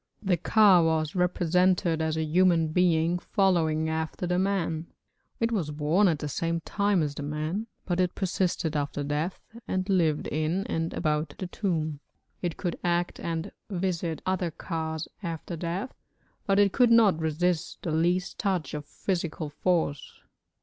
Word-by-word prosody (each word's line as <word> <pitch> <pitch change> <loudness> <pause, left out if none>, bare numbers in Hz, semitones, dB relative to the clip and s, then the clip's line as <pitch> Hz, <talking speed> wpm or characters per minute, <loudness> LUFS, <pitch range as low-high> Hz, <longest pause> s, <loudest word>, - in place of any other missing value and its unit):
The 190 -3 +3
ka 195 0 +5
was 160 -1 +1
represented 180 -1 +2
as 160 0 0
a 160 - 0
human 165 0 +3
being 170 0 +2
following 165 -6 +1
after 160 +2 -2
the 180 0 +1
man; 170 -4 -1 0.5
it 230 0 +1
was 185 -9 -1
born 150 +7 +2
at 165 -4 +2
the 150 - -4
same 165 +3 -1
time 200 -1 +1
as 145 -1 -2
the 145 - -6
man, 155 +9 -3 0.2
but 175 -1 -1
it 180 -1 +1
persisted 180 -4 -1
after 145 0 -2
death 150 +5 -2 0.3
and 185 0 -1
lived 165 -6 +2
in 155 +6 -1
and 165 0 -2
about 150 -2 -1
the 185 - -4
tomb. 160 -6 -2 0.4
It 175 -3 -2
could 175 -3 -3
act 175 0 0
and 165 -1 -3 0.2
visit 175 -4 -2
other 185 -2 0
kas 160 -1 -4
after 170 -1 -5
death, 175 +9 -3 0.5
but 195 -1 +3
it 205 -1 +4
could 245 -2 +5
not 220 -7 +5
resist 160 +1 -1
the 165 - -2
least 175 +3 0
touch 185 -8 -1
of 150 -1 -5
physical 170 -5 -3
force. 155 -2 -1
170 Hz, 155 wpm, -27 LUFS, 160-185 Hz, 0.5 s, ka